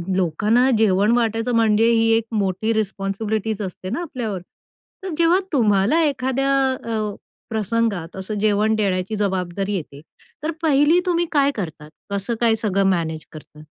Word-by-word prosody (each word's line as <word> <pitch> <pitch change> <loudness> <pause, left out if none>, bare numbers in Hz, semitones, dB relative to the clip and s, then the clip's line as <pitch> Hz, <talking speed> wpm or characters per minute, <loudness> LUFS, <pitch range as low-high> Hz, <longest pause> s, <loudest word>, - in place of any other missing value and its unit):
लोकांना 210 +9 +2
जेवण 205 0 +3
वाटायचं 230 +1 0
म्हणजे 225 0 +3
ही 225 0 +3
एक 225 - -2
मोठी 210 +1 0
रिस्पॉन्सिबिलिटीज 215 +1 -2
असते 185 -1 -6
ना, 255 - -2
आपल्यावर. 240 - -4 0.6
तर 385 - -4
जेव्हा 340 +2 +4
तुम्हाला 215 +4 +3
एखाद्या 270 -1 0 0.3
अ, 215 -3 -2 0.3
प्रसंगात 215 -5 -1
असं 190 +3 -5
जेवण 215 +1 +2
देण्याची 195 -1 -1
जबाबदारी 190 0 -2
येते, 145 -5 -6 0.4
तर 315 - -1
पहिली 305 +2 +4
तुम्ही 345 -1 +1
काय 280 -1 +3
करतात? 160 -6 -6 0.2
कसं 200 +3 -2
काय 230 -2 +4
सगळं 200 -3 0
मॅनेज 160 -4 -1
करतात? 150 -1 -13
215 Hz, 140 wpm, -21 LUFS, 190-235 Hz, 0.6 s, जेव्हा